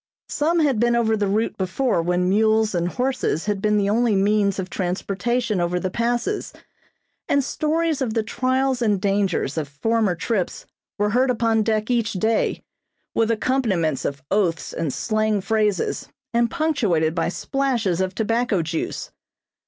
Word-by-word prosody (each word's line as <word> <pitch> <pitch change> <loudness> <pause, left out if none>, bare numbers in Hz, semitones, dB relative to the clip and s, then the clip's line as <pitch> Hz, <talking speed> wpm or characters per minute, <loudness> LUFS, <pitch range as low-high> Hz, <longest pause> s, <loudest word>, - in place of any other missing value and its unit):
Some 330 +3 +1
had 275 -7 +2
been 240 +1 +3
over 225 -2 +2
the 205 -2 0
route 215 +4 0
before 190 +2 0
when 180 +1 0
mules 220 +2 +3
and 175 -1 0
horses 250 - -1
had 205 -2 -1
been 210 0 +2
the 200 0 +1
only 230 -1 +2
means 200 0 +2
of 190 -2 -3
transportation 200 +4 -1
over 175 +1 0
the 185 0 -3
Passes, 240 - -1 0.8
and 280 -1 +3
stories 315 +1 0
of 235 -4 -1
the 225 - +1
trials 255 +3 0
and 210 -4 +2
dangers 195 -6 0
of 150 - -3
former 205 +7 0
trips 190 +2 -2 0.3
were 210 0 +1
heard 255 +3 +2
upon 230 -2 +2
deck 215 +1 0
each 230 -3 +1
day, 220 +4 0 0.5
with 225 -1 +1
accompaniments 215 - 0
of 140 -1 -4
oaths 185 -5 0
and 165 -4 -2
slang 215 - 0
phrases, 210 -1 0 0.2
and 235 0 +2
punctuated 230 - +1
by 165 0 0
splashes 235 -6 -1
of 185 0 -2
tobacco 225 -4 +1
juice. 165 +1 -4
215 Hz, 155 wpm, -22 LUFS, 185-240 Hz, 0.8 s, been